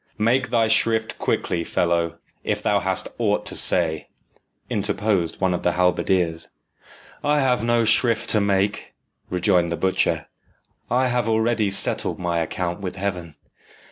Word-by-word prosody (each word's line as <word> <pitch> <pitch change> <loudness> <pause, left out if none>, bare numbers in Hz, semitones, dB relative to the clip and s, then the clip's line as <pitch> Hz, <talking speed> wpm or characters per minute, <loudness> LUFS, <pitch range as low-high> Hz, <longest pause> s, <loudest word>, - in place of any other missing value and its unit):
"Make 115 +3 +1
thy 115 -2 +2
shrift 110 0 +1
quickly, 85 -1 -1
fellow, 85 -1 -1 0.3
if - - -2
thou - - +2
hast - - -1
aught - - 0
to - - -3
say," 80 -3 +2 0.6
interposed 100 -4 -1
one 95 -1 +1
of 90 - -3
the 90 - +1
halberdiers. 90 -1 0 0.8
"I 150 0 +2
have 125 -4 +1
no 120 0 +2
shrift 115 0 +2
to 105 - +3
make," 100 0 -1 0.3
rejoined 90 -1 +1
the 85 - -3
butcher. 95 0 0 0.6
"I 130 +1 +1
have 120 -2 0
already 110 -1 +1
settled 95 - +1
my 85 -2 -1
account 85 +2 -3
with 95 -2 -5
Heaven. 90 -5 -4
100 Hz, 140 wpm, -22 LUFS, 90-115 Hz, 0.8 s, to